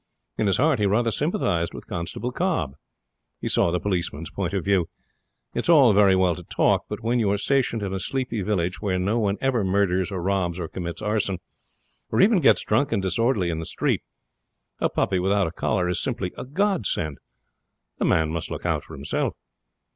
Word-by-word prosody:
In 110 - 0
his 95 - +2
heart 145 -3 +3
he 105 - +2
rather 115 +3 +2
sympathized 110 - 0
with - - -9
Constable 90 +8 -4
Cobb. 125 - -1 0.7
He - - -4
saw - - +2
the 90 +1 0
policeman's 85 -5 -2
point 90 -3 -2
of 100 -3 -2
view. 95 -4 +2 0.6
It - - -2
is - - -2
all 140 -9 +7
very 100 -1 +5
well 95 -2 +3
to 90 - -8
talk, - - +1
but - - -5
when 120 +2 +1
you 105 -3 +2
are 100 - +2
stationed 120 -2 +1
in 95 -1 -3
a 95 - -2
sleepy 125 0 -2
village 90 -3 -1
where 95 -3 0
no 100 +6 0
one 100 -2 0
ever 130 -5 +1
murders, 95 -1 +1
or 95 - -3
robs, 90 -1 -1
or 85 - -3
commits 85 0 -6
arson, 105 -3 0 0.7
or - - +1
even 200 +1 +5
gets 140 - +4
drunk 140 0 +1
and 100 - 0
disorderly 95 0 +1
in 80 - -3
the 80 - -5
street, - - 0 0.8
a - - +2
puppy 95 - 0
without 100 +2 +2
a 80 - -3
collar 90 +1 0
is 90 - 0
simply 90 - -2
a - - -6
godsend. 140 - -1 0.8
A - - +1
man 80 -1 +2
must 80 0 -3
look - - -6
out - - +1
for - - -11
himself. 70 +1 -2
100 Hz, 200 wpm, -24 LUFS, 90-115 Hz, 0.8 s, all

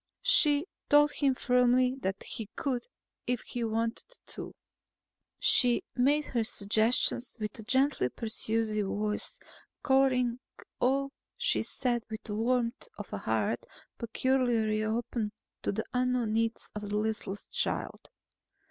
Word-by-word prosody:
She 310 -12 +4 0.2
told 295 0 +6
him 275 -3 +1
firmly 250 0 +3
that 190 -1 -2
he 220 -3 -7
could, 255 -4 -2 0.4
if 245 -2 0
he 245 - -4
wanted 230 - -2
to. - - -7 0.8
She 245 -1 +4
made 285 +4 +3
her 235 -3 0
suggestions 220 +3 +1
with 215 0 -5
gently 265 - +2
persuasive 220 - -1
voice, 210 +1 -3 0.5
coloring 255 -3 +3 0.4
all 275 +2 +1 0.3
she 485 - +2
said 240 -2 -1
with 220 -1 -6
the 210 - -5
warmth 235 +2 0
of 210 - -8
a 100 - -2
heart 110 +2 0 0.4
peculiarly 235 -3 +1
open 220 -1 -2 0.3
to - - 0
the 220 +2 -3
unknown 250 -3 +1
needs 230 0 -1
of 210 -1 -5
the 205 - 0
listless 215 -2 -2
child. - - -2
235 Hz, 125 wpm, -30 LUFS, 215-255 Hz, 0.8 s, told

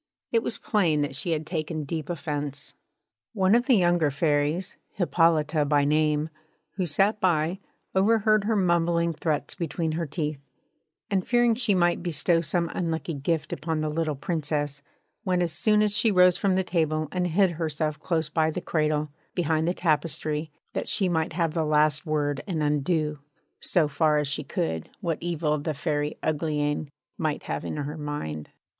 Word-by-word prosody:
It 230 - +3
was 225 - -3
plain 170 -8 +1
that 145 -2 -2
she 155 - -3
had 155 -1 0
taken 155 -2 -3
deep 155 +1 -4
offence. 145 -3 -4 0.6
One 190 -2 +3
of 240 +3 +3
the 260 - +6
younger 175 -5 +3
Fairies, 150 +5 0 0.2
Hippolyta 165 -4 +2
by 145 -1 +2
name, 150 +1 +2 0.4
who 185 -3 -2
sat 195 +8 +2
by, 170 0 +1 0.3
overheard 215 +1 +3
her 220 +1 +1
mumbling 170 -3 +2
threats 155 -1 -2
between 165 -1 -2
her 165 +1 -2
teeth; 150 -1 -3 0.7
and 190 -2 +2
fearing 240 -1 +4
she 220 -3 +1
might 175 -1 +2
bestow 165 0 +2
some 170 0 -1
unlucky 165 -1 -2
gift 150 +3 -1
upon 160 -1 -2
the 155 -1 -1
little 155 -1 -1
Princess, 145 -2 -2 0.4
went 180 -2 +1
as 170 - 0
soon 210 +4 +3
as 210 -1 +2
she 220 0 +3
rose 180 -2 +6
from 195 -2 +1
table 155 -3 0
and 180 -1 0
hid 185 +2 +3
herself 155 -2 -2
close 160 -1 -1
by 155 +1 +1
the 160 - -3
cradle, 155 -3 0 0.2
behind 160 -2 +1
the 175 - +2
tapestry, 155 -1 -1 0.2
that - - -3
she 190 -3 +1
might 160 -2 0
have 165 -2 0
the 165 -2 0
last 150 0 +2
word 145 -2 0
and 165 -5 -1
undo, 150 +1 0 0.4
so 170 -5 +1
far 150 +1 +2
as 150 -1 0
she 145 +2 -2
could, 80 - -3
what 165 -3 -2
evil 160 -3 0
the 150 +1 -3
Fairy 150 0 -2
Uglyane 150 -1 -1 0.3
might 155 -2 -1
have - - -3
in - - -4
her 150 +2 -4
mind. 80 - -5
160 Hz, 170 wpm, -26 LUFS, 150-175 Hz, 0.7 s, the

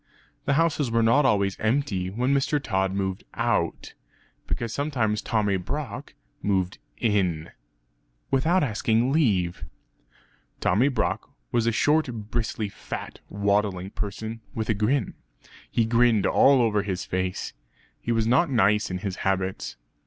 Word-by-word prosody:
The 140 - +2
houses 155 -4 +2
were 115 0 +2
not 135 +5 +4
always 100 -4 +1
empty 110 -6 0
when 125 +7 0
Mr. 140 +2 +2
Tod 95 -7 0
moved 95 -1 -2
out; - - -1 0.5
because 115 -1 -3
sometimes 120 -8 0
Tommy 105 -4 +1
Brock 90 - -5 0.3
moved 95 -2 0 0.2
in; 90 -8 0 0.8
(without 160 +7 +3
asking 115 0 +1
leave). 100 - +1 1.0
Tommy 105 +10 +3
Brock 130 -5 -1 0.2
was 115 -1 +1
a - - +4
short 150 +7 +2 0.2
bristly 110 -2 -1
fat - - -7
waddling 100 -2 0
person 110 +2 -5
with 110 -1 -3
a - - +4
grin; 110 +3 0 0.6
he 115 - +1
grinned 115 -2 +3
all 135 -2 +5
over 105 -3 +2
his 95 -3 -3
face. 95 0 -2 0.5
He 120 - -3
was 115 -1 +2
not 155 +9 +3
nice 105 -4 +3
in 90 - -2
his 95 0 -4
habits. 95 -1 -1
110 Hz, 135 wpm, -25 LUFS, 95-125 Hz, 1.0 s, all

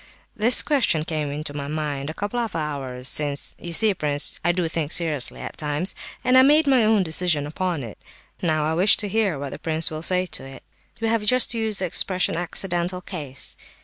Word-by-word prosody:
This 230 +3 +2
question 235 - +2
came 155 -3 -3
into 145 +1 -5
my 140 -1 -5
mind 150 -2 -3
a 155 - -6
couple 205 +4 -3
of 230 -4 -3
hours 135 -5 -3
since 145 -1 +2
(you 170 - -6
see, 210 +5 +4
prince, 145 -4 +1
I 175 - +3
do 175 -1 -1
think 160 -2 -3
seriously 155 -7 0
at - - -7
times), 150 +5 -1 0.3
and 255 +1 +5
I - - +8
made 295 +4 +5
my 265 -4 +4
own 215 -2 +3
decision 160 -3 0
upon 165 0 -3
it; 110 -3 -9 0.4
now 155 -3 0
I 155 - 0
wish 185 +5 +5
to 210 - -1
hear 200 -5 0
what 140 -1 -6
the - - -8
prince 160 +1 +1
will 155 0 -5
say 185 +2 +2
to 155 -3 -5
it." 135 0 -11 0.4
"We 225 - 0
have 230 -1 +1
just 250 +3 +4
used 220 -4 0
the - - +1
expression 180 0 0
'accidental 175 +1 -1
case. 145 -8 -5
170 Hz, 210 wpm, -23 LUFS, 150-205 Hz, 0.4 s, I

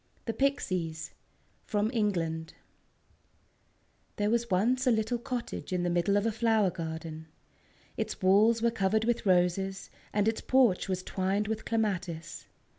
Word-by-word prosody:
THE 225 - -2
PIXIES 185 - -1 0.6
From 210 +1 0
England 165 -8 -1 1.6
There 210 +1 0
was 235 0 +1
once 245 +8 +2
a - - +6
little 225 +2 0
cottage 240 -3 -5
in 180 -1 0
the 175 - 0
middle 175 +4 +2
of 205 - 0
a 225 - +2
flower 220 -3 +2
garden. 160 -1 -6 0.7
Its 220 -1 -3
walls 215 +5 +4
were 235 - +3
covered 220 0 +1
with 235 -2 0
roses, 185 +1 +1 0.2
and 205 0 +1
its 225 - 0
porch 245 -9 +3
was 185 -1 -2
twined 195 +3 -1
with 220 0 -3
clematis. 185 -7 -2
205 Hz, 140 wpm, -30 LUFS, 180-225 Hz, 1.6 s, a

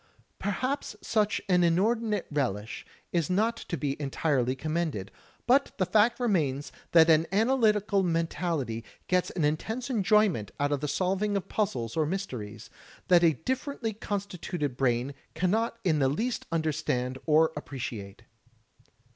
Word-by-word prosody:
Perhaps 255 +8 -2
such 215 -2 +1
an 180 -2 +4
inordinate 210 +4 +1
relish 115 -7 -2 0.2
is 170 -4 0
not 220 +5 +2
to 175 -6 -5
be 140 +1 -3
entirely 135 -3 0
commended, 155 - -2 0.3
but 270 +4 +3
the 185 - +2
fact 215 +6 +3
remains 155 - 0 0.2
that 165 -1 +7
an 160 0 +4
analytical 210 -2 +3
men 165 -2 +1
tality 150 -10 -3 0.2
gets 180 -1 +2
an 165 -5 -1
intense 220 - -2
enjoyment 210 - +2
out 145 0 +1
of 145 -1 0
the 150 - -1
solving 195 +5 0
of 195 - -5
puzzles 195 - -1
or 155 -2 +1
mysteries, 115 - -5 0.4
that 175 -1 +6
a 165 -2 +5
differently 255 - -3
constituted 190 - -4
brain 125 +1 0 0.2
cannot 215 +8 0
in 160 -6 +2
the 135 -1 +3
least 225 - -2
imderstand 150 -6 -1
or 160 +1 +5
appreciate. 120 -7 -6
170 Hz, 140 wpm, -28 LUFS, 140-210 Hz, 0.4 s, that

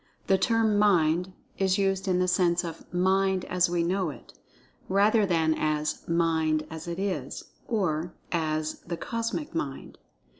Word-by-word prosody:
The 190 -1 +3
term 220 0 +2
"Mind" 180 -3 +3 0.3
is 190 -1 +2
used 195 0 0
in 185 -1 +2
the 180 0 +2
sense 180 -1 +2
of 165 -2 -8
"Mind, 190 +1 +2
as 180 -1 +1
we 175 -1 +1
know 185 0 0
it," 145 - -11 0.6
rather 205 +2 +4
than 160 -3 +2
as 155 -1 -1
"Mind, 160 -2 +1
as 160 +1 -7
it 170 0 -4
is"—or, 185 -3 -3 0.2
as 155 -2 -1
"The 170 0 -6
Cosmic 230 - -3
Mind." 140 -5 -5
180 Hz, 145 wpm, -27 LUFS, 160-195 Hz, 0.6 s, rather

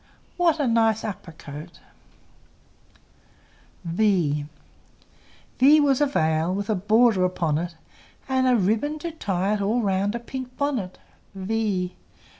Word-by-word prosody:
What 335 -3 +2
a 290 - +1
nice 225 -2 +2
upper 195 -5 -6
coat! 155 +2 -10 2.1
V 170 -6 +1 1.1
V 290 +4 +7
was 280 -2 +2
a 290 - +4
veil 160 - +1
With 200 +2 -2
a - - +3
border 215 +1 +3
upon 165 -4 0
it, 170 0 -5 0.5
And 260 -1 +1
a 250 - +4
ribbon 225 +9 0
to 335 +2 -5
tie 200 - -1
it 210 - -1
All 220 +4 +1
round 200 +2 0
a - - -2
pink 255 +1 -8
bonnet. 260 -11 -2 0.4
v! 190 -2 -2
210 Hz, 130 wpm, -24 LUFS, 180-255 Hz, 2.1 s, V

